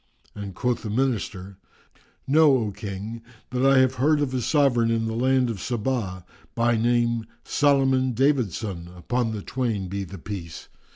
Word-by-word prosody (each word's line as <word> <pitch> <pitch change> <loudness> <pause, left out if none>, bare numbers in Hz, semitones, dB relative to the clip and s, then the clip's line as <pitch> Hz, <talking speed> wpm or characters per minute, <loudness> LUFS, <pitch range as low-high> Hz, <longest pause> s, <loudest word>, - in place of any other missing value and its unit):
and 100 -3 -7
quoth 125 +2 -1
the 110 - -5
Minister, 105 -6 -2 0.7
"Know, 145 -1 +5
O 110 -4 -2
King 105 +3 -6 0.3
that 125 +1 -1
I 135 0 +5
have 130 -1 +4
heard 150 +2 +4
of 140 -3 -1
a 130 - 0
Sovran 125 -4 +3
in 115 -1 +1
the 110 - -2
land 130 +2 +2
of 115 -3 -3
Sabá[FN#358] 110 -5 -2 0.3
by 120 0 +2
name 115 0 +1 0.2
Solomon 135 -3 +2
David 130 -4 +2
son 85 -3 -5
(upon 115 +6 -1
the 105 -2 -5
twain 115 -8 -2
be 100 +1 -3
the 95 +1 -9
Peace!) 85 -3 -7
115 Hz, 165 wpm, -25 LUFS, 100-130 Hz, 0.7 s, Know